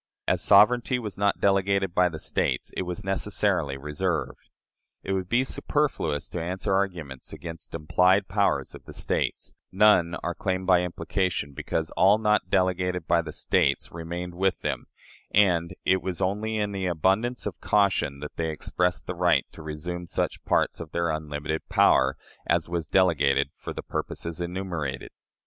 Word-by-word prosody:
As - - +2
sovereignty 120 +5 +5
was 105 -6 -5
not 100 0 +1
delegated 100 -1 +2
by 90 0 +4
the 80 - -7
States, - - -2
it - - -1
was 90 -1 -5
necessarily 95 -6 0
reserved. 75 +2 -3 0.5
It 95 - -3
would 95 -1 -2
be 125 +2 +3
superfluous 75 - -1
to 85 - -4
answer 90 +3 -2
arguments 85 -9 -2
against 85 -1 -8
implied 90 +5 +3
powers 100 0 0
of - - -12
the - - -10
States; - - -2 0.2
none 95 -4 +4
are 90 - -1
claimed 95 +1 -2
by 90 -1 +5
implication, 85 -3 -2
because 80 +2 -3
all 100 +3 +5
not 105 -4 +1
delegated 90 -2 +1
by 85 - +3
the 80 -2 -7
States - - +1
remained 85 +2 -5
with 95 +1 0
them, - - -3 0.4
and 90 -4 +3
it 95 0 +3
was 95 -2 -4
only 105 +4 -1
in 105 -1 -1
an 95 -1 -2
abundance 95 +9 +1
of - - -5
caution 100 -9 +1
that 75 - -8
they 80 -1 -1
expressed 85 +1 -1
the 90 - -3
right 90 0 +2
to - - -11
resume 85 +3 -5
such - - -2
parts - - +1
of 80 -2 -8
their 85 -1 0
unlimited 75 0 -4
power 65 +1 +4 0.3
as - - +1
was 85 -2 -3
delegated 80 -8 +3
for - - -7
the - - -6
purposes 85 +1 -4
enumerated. 85 -6 -4
90 Hz, 165 wpm, -26 LUFS, 80-95 Hz, 0.5 s, sovereignty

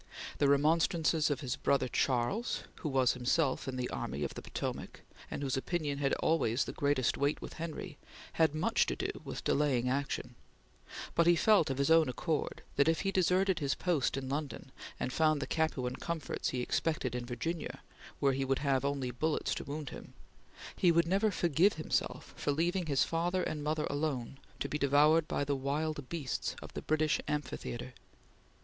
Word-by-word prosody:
The 145 - +4
remonstrances 155 +2 +3
of 145 -1 -1
his 130 -3 -2
brother 140 -2 +1
Charles, 130 - 0
who 155 - -3
was 130 -3 +3
himself 130 +3 +1
in 130 - -3
the 125 -1 -2
Army - - -3
of - - -3
the - - -7
Potomac, - - -5 0.3
and - - -4
whose 135 -2 0
opinion 145 0 -2
had 140 -1 +1
always 140 -6 +2
the - - -6
greatest 140 -4 +1
weight 140 +2 +1
with - - -8
Henry, 165 0 -6 0.3
had 160 -2 +3
much 155 - +2
to - - -1
do - - -2
with - - -6
delaying 130 -4 +2
action; 135 -2 -2 0.8
but 170 0 +3
he 175 - +7
felt, 205 -2 +4
of 135 - -2
his 140 +3 +2
own 160 -3 +6
accord, 155 +5 -2
that 140 - +4
if 165 0 +2
he 195 - 0
deserted 185 0 +2
his 140 -2 0
post 165 -8 0
in 135 -1 -4
London, 140 -1 -4 0.3
and 125 - -2
found 155 -2 +3
the 140 - -2
Capuan 130 -6 -1
comforts 170 -3 -3
he 125 - -2
expected 140 -3 -1
in 125 0 -3
Virginia 130 +8 -4 0.4
where 140 -1 +3
he 135 +1 -1
would 135 0 +1
have 135 -2 +1
only 140 -3 -1
bullets 155 +6 0
to - - -4
wound 145 -1 -5
him, - - -10 0.6
he 180 - +4
would 170 0 +4
never 200 +5 +3
forgive 175 +1 +3
himself 155 - -2
for 145 - -1
leaving 170 +4 0
his 140 -3 +3
father 175 +2 0
and 150 -1 -3
mother 155 +1 0
alone 140 -3 -2 0.2
to - - -1
be 150 - -3
devoured 150 +3 +4
by 145 - -1
the 140 0 0
wild 145 +1 -2
beasts 155 -7 -3
of - - -11
the - - -4
British 155 0 +1
amphitheatre. 130 -4 -4
145 Hz, 185 wpm, -32 LUFS, 135-165 Hz, 0.8 s, he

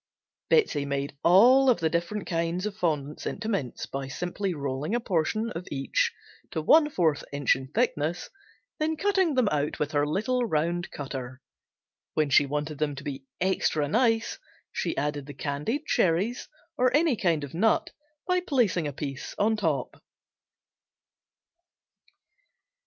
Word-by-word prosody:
Betsey 285 - +3
made 140 0 -3
all 250 +10 +7
of 240 - +4
the 165 - +2
different 175 +5 -2
kinds 170 +2 -1
of 210 -1 -3
fondants 150 -7 -2
into 220 - -4
mints 165 - -2
by 135 0 -5
simply 180 +7 -3
rolling 145 - -2
a - - +2
portion 215 +3 0
of 175 0 -6
each 135 -1 0 0.4
to - - -3
one 295 - +5
fourth 165 - +1
inch 145 -1 +2
in 130 0 -7
thickness, 170 - -1 0.5
then 315 +1 0
cutting 380 -5 +2
them 255 -4 +3
out 150 0 -1
with 150 0 -2
her 145 -1 +1
little 225 +10 0
round 175 -3 -1
cutter. 130 -2 -6 0.8
When 155 -2 +1
she 140 - +5
wanted 150 +1 -3
them 150 -2 0
to 140 - -8
be 135 -2 -6
extra 170 -5 +1
nice 225 - +1 0.3
she - - -2
added 145 -1 -2
the 145 - -9
candied 150 - -2
cherries 190 +8 +1 0.3
or 255 0 +5
any 315 -4 +3
kind 170 -7 +1
of 140 - -7
nut 215 +7 +2 0.4
by 365 0 +3
placing 240 - +1
a 145 - -4
piece 140 0 -6
on 220 +2 +2
top. 215 - -2
170 Hz, 150 wpm, -27 LUFS, 145-225 Hz, 0.8 s, all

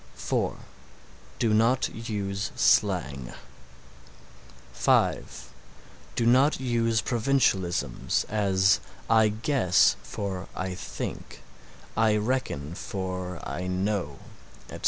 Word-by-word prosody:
(4) - - -1 0.8
Do 115 -3 +1
not 115 +4 +3
use 100 -3 -3
slang. 65 -1 +2 1.4
(5) - - +1 0.7
Do 115 - +1
not 130 +5 +4
use 115 -3 +1
provincialisms, 95 - 0
as 100 -2 +3 0.3
"I 110 -1 +6
guess" 110 - +3
for 95 -2 -5
"I 95 0 -3
think"; - - -7 0.5
"I 110 -1 +3
reckon" 105 - -2
for 90 -2 -5
"I 90 +1 -4
know," 90 -5 -1 0.5
etc. - - -7
105 Hz, 90 wpm, -27 LUFS, 90-115 Hz, 1.4 s, I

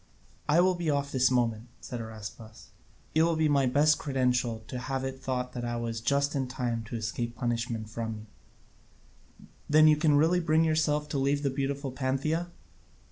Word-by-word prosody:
"I 160 +4 +5
will 185 +1 +4
be 175 -3 -2
off 140 -1 0
this 130 -1 +3
moment," 120 -2 0
said 120 -2 -6
Araspas; 110 0 -10 0.4
"it 160 - +4
will 165 0 +3
be 160 -1 +2
my 140 -3 +3
best 150 +4 +3
credential 125 -5 0
to 125 - -5
have 135 +1 -3
it 135 0 -5
thought 125 -1 -3
I 120 -1 -3
was 115 -1 -3
just 140 +3 +1
in 135 -3 -1
time 120 -3 -3
to 115 - -6
escape 115 +1 -3
punishment 115 -2 -2
from 110 0 -4
you." 105 0 -20 0.2
"Then 155 +1 +6
you 155 -1 +5
can 150 -1 +3
really 165 +4 +3
bring 160 -1 +3
yourself 155 -2 +1
to 140 - -1
leave 140 +2 +1
the 140 - +1
beautiful 135 0 -2
Pantheia?" 140 +6 -1
130 Hz, 180 wpm, -29 LUFS, 120-150 Hz, 0.4 s, Then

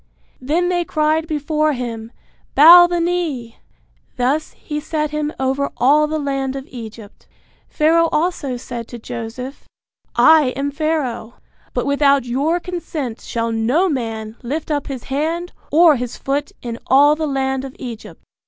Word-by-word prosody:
Then 330 +7 0
they 350 -1 +1
cried 310 0 0
before 305 0 0
him, 230 -3 -5 0.4
Bow 345 +5 +9
the 350 0 -1
knee! 330 -9 -2 0.6
Thus 270 +5 0
he 300 -1 -5
set 305 0 -2
him 300 0 -2
over 265 +1 0
all 300 +4 +4
the 310 +1 -2
land 275 -2 -2
of 270 -1 -6
Egypt. 225 -3 -10 0.4
Pharaoh 330 +1 +3
also 300 -6 -1
said 240 -2 -7
to 240 - -8
Joseph, 245 +3 -7 0.5
I 310 -5 +5
am 280 +1 -2
Pharaoh, 280 -7 -2 0.4
but - - 0
without 280 -2 +3
your 285 +8 0
consent 325 -9 -5
shall 230 0 -3
no 240 +12 +2
man 225 -5 -4
lift 295 +6 -4
up 290 -1 -1
his 265 -4 -6
hand 325 +6 -2 0.2
or 315 -1 +6
his 245 0 -5
foot 280 +1 -2
in 235 -1 -5
all 290 +3 +5
the 310 0 -2
land 265 -1 -1
of 270 0 -8
Egypt. 235 -4 -9
280 Hz, 150 wpm, -19 LUFS, 250-310 Hz, 0.6 s, Bow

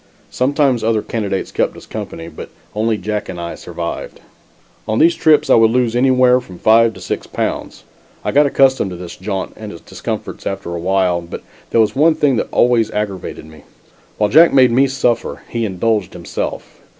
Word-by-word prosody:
Sometimes 135 -2 +1
other 110 -1 +1
candidates 100 -4 -3
kept - - -1
us - - -12
company, 80 0 -7
but 80 - -9 0.2
only 110 +1 0
Jack 105 +2 -4
and 90 -2 -6
I 85 0 -5
survived. - - -6 0.7
On 110 0 0
these 165 +5 +5
trips, 155 -2 +3
I - - +4
would 115 -1 +5
lose 120 -1 +1
anywhere 125 0 +4
from 95 -7 -12
five 115 +2 +4
to - - -11
six - - -4
pounds. - - -4 0.4
I - - 0
got 145 +1 +4
accustomed 135 -6 +3
to 90 - -7
this 90 -1 -8
jaunt 95 0 -4
and 105 -1 -8
its 85 - -11
discomforts - - -6
after 95 -3 -4
a 85 - -3
while, 90 -1 +1
but 85 - -9 0.3
there 115 - +3
was 110 -1 +1
one 155 +3 +4
thing 145 -4 +2
that - - -1
always 120 -2 +3
aggravated 100 -6 -4
me. 80 0 -15 0.6
While 105 -1 +1
Jack 165 +4 +7
made 130 -3 +5
me 135 +4 +4
suffer, 130 -3 -1
he 115 -1 -2
indulged 105 +1 -1
himself. - - -6
115 Hz, 185 wpm, -17 LUFS, 95-130 Hz, 0.7 s, Jack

